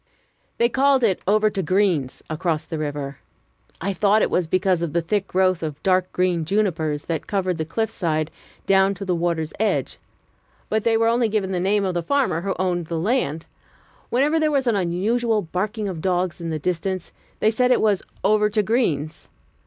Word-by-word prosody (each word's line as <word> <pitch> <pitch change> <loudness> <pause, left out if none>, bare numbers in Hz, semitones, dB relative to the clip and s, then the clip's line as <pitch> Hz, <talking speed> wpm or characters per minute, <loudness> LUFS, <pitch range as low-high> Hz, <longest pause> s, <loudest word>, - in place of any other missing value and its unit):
They 235 - +4
called 270 +1 +3
it 195 -5 +2
"over 215 +1 +3
to 195 - -2
Green's" 180 -6 0
across 155 0 -2
the 160 - -5
river. 145 -2 -4 0.6
I 195 +3 -2
thought 205 +3 +3
it - - 0
was 180 -2 +1
because 185 0 +1
of 165 -4 -2
the 170 - +2
thick 195 +3 -1
growth 185 -1 +2
of 155 -3 -4
dark 185 -1 +2
green 180 -2 +1
junipers, 160 -5 0
that 165 -3 -3
covered 185 -4 -1
the 160 - -1
cliff 220 +7 -2
side 155 -5 -1 0.3
down 195 0 +3
to 195 +1 -6
the 185 - 0
water's 165 -2 -1
edge; 220 - 0 0.7
but 220 0 0
they 225 -1 +3
were 225 0 +2
only 235 0 +2
giving 205 -3 -1
the 180 - -1
name 200 +2 +1
of 185 - -1
the 175 - -1
farmer 250 - 0
who 195 +1 -2
owned 175 -3 -1
the 165 0 -3
land, 165 - 0 0.6
Whenever 290 +6 +2
there 310 -1 +2
was 275 -3 +1
an 235 -3 +2
unusual 210 +5 0
barking 205 +5 -3
of 175 -5 -5
dogs 180 -1 -1
in 165 - -4
the 160 - -2
distance, 180 +3 -3 0.3
they 215 - +3
said 250 +3 +2
it 250 - +4
was 205 -3 +2 0.2
"over 210 +1 +3
to 210 0 +1
Green's." 170 - -1
190 Hz, 195 wpm, -22 LUFS, 165-215 Hz, 0.7 s, They